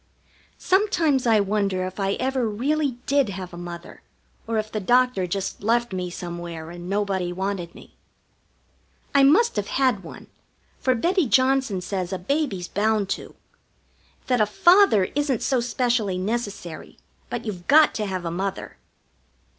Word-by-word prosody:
Sometimes 340 - +2
I 220 -2 +5
wonder 200 -2 0
if 185 +2 -7
I 195 0 0
ever 260 -2 -1
really 280 +6 0
did 280 -4 +2
have 185 -2 -7
a - - -7
Mother, 175 0 -9 0.5
or 225 0 -1
if 215 0 -2
the 215 - -2
doctor 245 -2 +2
just 195 +2 -4
left 235 +1 +1
me 180 -1 -3
somewhere 170 -2 -7
and 175 +1 -8
nobody 195 -3 -1
wanted 185 -2 -4
me. - - -15 1.2
I 280 - +5
must 315 - +4
have 205 - -1
had 255 -7 +1
one, 170 - -11 0.5
for 255 -1 +1
Betty 345 - +1
Johnson 260 -6 +2
says 180 0 -3
a 190 - -2
baby's 200 - -2
bound 210 -1 0
to. - - -5 0.9
That 250 -3 +1
a 210 - +3
father 345 - +5
isn't 285 -4 0
so 260 - +1
specially 235 -4 0
necessary, 195 -5 -4 0.3
but 240 -1 -4
you've 185 -5 -6
got 305 +1 +6
to 210 -2 -2
have 185 -2 -4
a 165 - -2
Mother. 190 +3 -4
210 Hz, 155 wpm, -24 LUFS, 185-255 Hz, 1.2 s, got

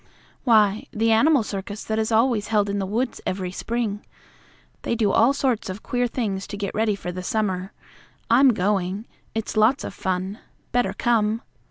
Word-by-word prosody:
"Why, 215 -3 +4
the 225 +1 +1
animal 270 +4 +4
circus 205 +1 -5
that 220 0 -1
is 220 +1 -1
always 225 -1 +2
held 205 -2 +1
in 200 - -1
the 190 - -2
woods 235 +5 -2
every 185 -1 -3
spring. 220 0 -3 0.8
They - - -1
do 215 -4 +2
all 230 +6 +5
sorts 260 -7 0
of 185 +4 -6
queer 245 0 0
things 205 -6 -3
to 205 - -6
get 200 -1 -3
ready 215 -1 +1
for 180 -2 -5
the 185 +1 -5
summer. 190 -1 -1 0.6
I'm 260 +4 +6
going. 195 +1 0 0.3
It's 225 0 -3
lots 220 +6 +3
of - - -5
fun. 190 +2 -3 0.3
Better 245 -6 +1
come." 220 0 +1
215 Hz, 175 wpm, -24 LUFS, 195-230 Hz, 0.8 s, I'm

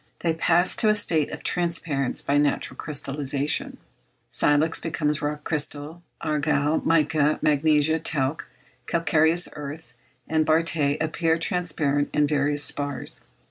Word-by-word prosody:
They 165 -2 +1
pass 170 +2 +2
to 215 - +4
a 215 - +4
state 165 -8 +1
of - - -8
transparence 165 -6 0
by 145 +1 +2
natural 145 -1 0
crystallization. 145 -1 -2 0.5
Silex 150 +3 +3
becomes 150 -2 -1
rock 150 0 -3
crystal; 150 +1 -2 0.2
argile, 150 -1 0
mica; 155 -2 +2
magnesia, 155 +1 +2
talc; 150 -2 -2 0.4
calcareous 165 +1 +2
earth 150 +2 -8 0.3
and 160 0 +1
barytes 155 -2 +1
appear 160 +1 0
transparent 155 -5 -1
in 150 - +3
various 145 0 +1
spars. 145 0 -1
150 Hz, 120 wpm, -24 LUFS, 145-160 Hz, 0.5 s, to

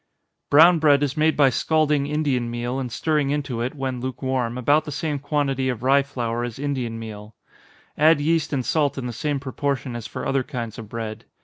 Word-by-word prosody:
_ - - -57
Brown 165 +4 +7
bread 145 -2 +4
is 140 0 -1
made 155 0 +2
by 140 -3 +5
scalding 150 +1 +1
Indian 145 -5 0
meal, 120 +2 -3
and 125 -3 -4
stirring 150 +1 0
into 140 -5 -2
it, 125 +5 -3
when 130 -3 -3
lukewarm, 130 -2 -2
about 145 +5 +3
the 150 - -6
same 150 0 -2
quantity 135 -2 0
of 120 -2 -4
rye 135 +2 +5
flour 120 -4 -3
as 120 -2 -5
Indian 130 -5 -3
meal 110 -1 -9 0.6
add 155 0 +5
yeast 160 +1 +1
and 130 -4 -1
salt 145 -3 +1
in 130 - -4
the 120 - -4
same 145 +4 -2
proportion 135 -1 -3
as 115 -2 -5
for - - -6
other 135 0 +1
kinds 120 -5 -6
of 110 -2 -9
bread. 110 -1 -6
135 Hz, 205 wpm, -23 LUFS, 120-145 Hz, 0.6 s, Brown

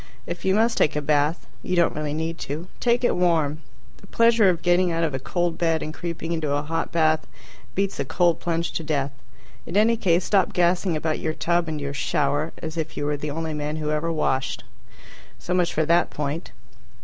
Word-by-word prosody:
If 170 - -6
you 190 0 +3
must 225 +2 +2
take 150 - +3
a - - +1
bath 150 +3 +1 0.2
(you 180 - -2
don't 170 -1 +3
really 150 0 -2
need 160 +1 -3
to), 155 +5 -4
take 240 +1 +2
it - - +3
warm. 160 -4 +2 0.4
The 195 - -17
pleasure 230 -3 +4
of 170 -2 -1
getting 175 0 +3
out 165 0 0
of 155 -4 0
a 130 - -2
cold 175 +4 -1
bed 165 -2 +1
and 155 - -5
creeping 170 0 -5
into 160 -3 -1
a 145 - -1
hot 165 +2 -2
bath 155 -1 +2 0.5
beats 195 -3 -1
a - - +1
cold 170 +3 +2
plunge 170 -1 -1
to 165 - -3
death. 145 -3 -1 0.6
In 175 - -1
any 225 +2 +5
case, 180 -5 +2
stop 195 -3 +2
gassing 175 -1 +2
about 155 0 -1
your 155 -1 -2
tub 170 0 +1
and 155 -1 -3
your 140 0 -4
"shower," 145 +1 0
as 160 0 -5
if 160 -1 -4
you 145 - -2
were 150 0 0
the 150 +1 -4
only 160 +1 -3
man 150 0 -3
who 155 -1 -2
ever 155 +2 0
washed. 135 -4 -1 0.7
So 180 - -4
much 180 -1 +2
for 155 - +1
that 170 +1 +3
point. 150 +3 -4
165 Hz, 215 wpm, -24 LUFS, 150-175 Hz, 0.7 s, any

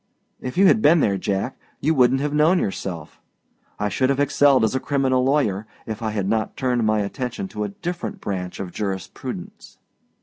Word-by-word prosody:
If 130 +4 -6
you 195 - +6
had 215 +3 +5
been 165 -1 +6
there, 100 -8 +1
Jack, 100 +6 -2 0.2
you 155 +3 +2
wouldnât 130 -1 +4
have 145 0 -1
known 155 +5 +4
yourself. 90 - -4 0.6
I 105 - -1
should 130 +5 +1
have 140 0 +1
excelled 145 -2 +4
as 110 - +2
a 130 - +1
criminal 130 -2 +1
lawyer, 110 -7 +1 0.2
if 110 0 -5
I 110 - -1
had 105 -3 -2
not 110 +1 -1
turned 125 -3 +1
my 110 -1 +2
attention 125 - -4
to 105 - -3
a - - -4
different 170 - -5
branch 90 -3 -4
of 95 -2 -5
jurisprudence. 95 -3 -6
125 Hz, 190 wpm, -22 LUFS, 100-140 Hz, 0.6 s, you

